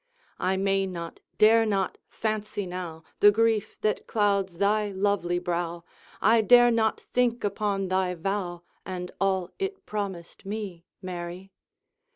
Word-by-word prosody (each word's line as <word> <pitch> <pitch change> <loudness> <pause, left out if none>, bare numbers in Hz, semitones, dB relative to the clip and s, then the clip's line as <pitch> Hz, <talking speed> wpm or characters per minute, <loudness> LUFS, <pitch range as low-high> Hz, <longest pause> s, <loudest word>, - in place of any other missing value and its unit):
I 190 +1 +1
may 195 0 +1
not, 170 -2 -6 0.2
dare 225 +1 +6
not, 200 -3 -1
fancy 215 -2 -3
now 175 -3 -6 0.2
The 205 - +8
grief 220 0 +1
that 215 0 0
clouds 200 -4 +1
thy 205 +2 +2
lovely 190 -3 0
brow, 175 -1 -2 0.4
I 225 +2 +6
dare 240 +2 +7
not 220 -1 +1
think 245 -1 0
upon 200 -1 -1
thy 185 -1 0
vow, 175 -1 -3 0.2
And 180 -1 -5
all 190 -2 +1
it 390 0 -4
promised 195 -5 -5
me, 195 -4 -5 0.2
Mary. 180 +1 -6
195 Hz, 135 wpm, -27 LUFS, 180-215 Hz, 0.4 s, The